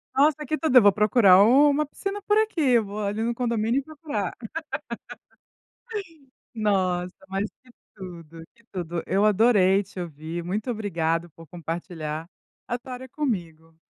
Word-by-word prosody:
Nossa, 290 +2 +4 0.2
tudo 265 -6 +4
eu - - +10
vou 205 0 +7
procurar 210 -3 +6
uma 285 +5 +5
piscina 395 +7 -5
por 415 +1 +2
aqui, 315 - +3
vou 210 0 -5
ali 210 +3 -1
no 235 +1 0
condomínio 235 +1 0
e - - -6
procurar. 290 - -4 2.2
Nossa, 185 -4 0
mas 195 +2 -2
que 255 - -21 0.2
tudo, 170 -4 -10 0.3
tudo, 175 -2 -3
eu 195 +3 +2
adorei 205 -2 +4
te 190 -1 -9
ouvir, 165 +1 -6
muito 210 +7 -3
obrigada 170 -6 -1
por 165 +2 -15
compartilhar, 165 -1 -5 0.4
a 240 - -2
história 255 +1 -7
comigo. 165 - -4
205 Hz, 135 wpm, -25 LUFS, 175-250 Hz, 2.2 s, eu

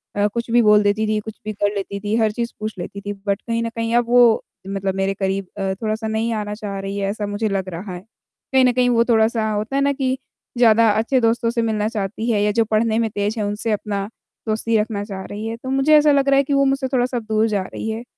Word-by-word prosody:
अ, 205 0 +2
कुछ 235 0 -3
भी 240 - +5
बोल 210 -1 +5
देती 205 +2 +1
थी, 215 0 +1
कुछ 220 +1 -7
भी 215 - -3
कर 205 +1 0
लेती 200 0 -4
थी, 210 +2 -2
हर 220 -2 +2
चीज़ 235 +2 -4
पूछ 215 0 -4
लेती 200 +3 -6
थी। 205 +1 -4
बट 200 0 0
कहीं 230 0 -2
न 230 - -2
कहीं 230 0 -2
अब 240 - +3
वो 240 -2 +5 0.3
मतलब 195 -1 -2
मेरे 195 0 0
करीब 195 0 -2
अ, 195 -1 -1
थोड़ा-सा 220 0 -2
नहीं 220 +1 -1
आना 210 -1 -3
चाह 200 -2 -5
रही 195 +1 -4
है, 195 -1 -1
ऐसा 210 0 -3
मुझे 205 +1 -2
लग 195 -1 -2
रहा 180 +2 -6
है। - - -7 0.5
कहीं 260 -1 +5
न 250 - +4
कहीं 250 0 +2
वो 235 -1 +4
थोड़ा-सा 220 -1 +2
होता 210 +5 -2
है 275 - +2
ना 280 - +3
कि 265 -1 -1 0.4
ज़्यादा 230 -1 +5
अच्छे 225 +5 +1
दोस्तों 230 +1 +2
से 235 0 0
मिलना 215 -2 0
चाहती 220 +1 -3
है 205 - +2
या 210 - +2
जो 225 - +4
पढ़ने 220 +1 +1
में 225 -1 +1
तेज़ 205 +2 -2
है, 210 - 0
उनसे 210 +2 -2
अपना 205 -1 -2 0.4
दोस्ती 220 +1 +1
रखना 210 -1 -1
चाह 195 -2 -6
रही 210 +2 -6
है, 230 +1 -4
तो 260 - -8
मुझे 270 +3 +4
ऐसा 300 0 +5
लग 275 -1 +3
रहा 275 - +5
है 280 - +4
कि 285 - -2
वो 275 0 +3
मुझसे 270 0 +1
थोड़ा-सा 250 0 +1
दूर 220 0 0
जा 205 -3 0
रही 220 - -6
है। 220 +1 -4
220 Hz, 265 wpm, -21 LUFS, 205-235 Hz, 0.5 s, भी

